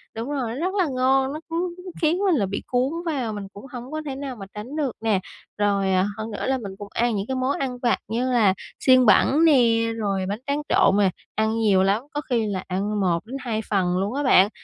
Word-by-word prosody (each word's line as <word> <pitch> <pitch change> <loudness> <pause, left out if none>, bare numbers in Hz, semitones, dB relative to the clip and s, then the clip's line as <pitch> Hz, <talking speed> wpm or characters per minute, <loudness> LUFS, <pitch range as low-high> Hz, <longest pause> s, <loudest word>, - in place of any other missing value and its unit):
Đúng 230 +5 -4
rồi, 250 -5 -2
rất 360 +7 -2
là 380 -4 +2
ngon, 265 +1 +2
nó 310 - -5
cứ 345 +1 -2 0.3
khiến 320 +3 +3
mình 385 -4 +2
là 205 -7 +1
bị 200 +2 -4
cuốn 255 +4 0
vào, 260 -9 -2
mình 200 -1 -6
cũng 205 - -11
hổng 250 +2 -8
có 310 0 -3
thể 270 -2 -4
nào 270 -2 -5
mà 195 -3 -8
tránh 225 +8 -7
được 285 -5 0
nè. 215 -4 +2 0.4
Rồi, 200 -2 +1
à, 185 +1 +3
hơn 220 +1 -5
nữa - - -4
là 265 0 +1
mình 200 -5 -7
cũng 205 - -8
ăn 235 -1 +1
những 200 +1 -3
cái 265 - -2
món 255 +2 0
ăn 255 -2 -2
vặt 240 -2 +2
như 245 +4 -1
là 215 -6 +4 0.3
xiên 255 -1 +5
bẩn 295 +8 +5
nè, 285 -6 +6 0.4
rồi 195 -3 -1
bánh 210 +3 -3
tráng 285 +1 0
trộn 195 - +4
mà 200 -2 +4 0.3
ăn 220 +1 +1
nhiều 195 -4 +4
lắm, 200 +5 +1
có 295 - -2
khi 230 -3 +1
là 190 -2 -3
ăn 200 +3 -1
1-2 220 +6 -1
phần 180 -3 +1
luôn 200 +5 -1
á 290 +1 -1
bạn, 205 -6 +5
235 Hz, 240 wpm, -23 LUFS, 205-270 Hz, 0.4 s, nè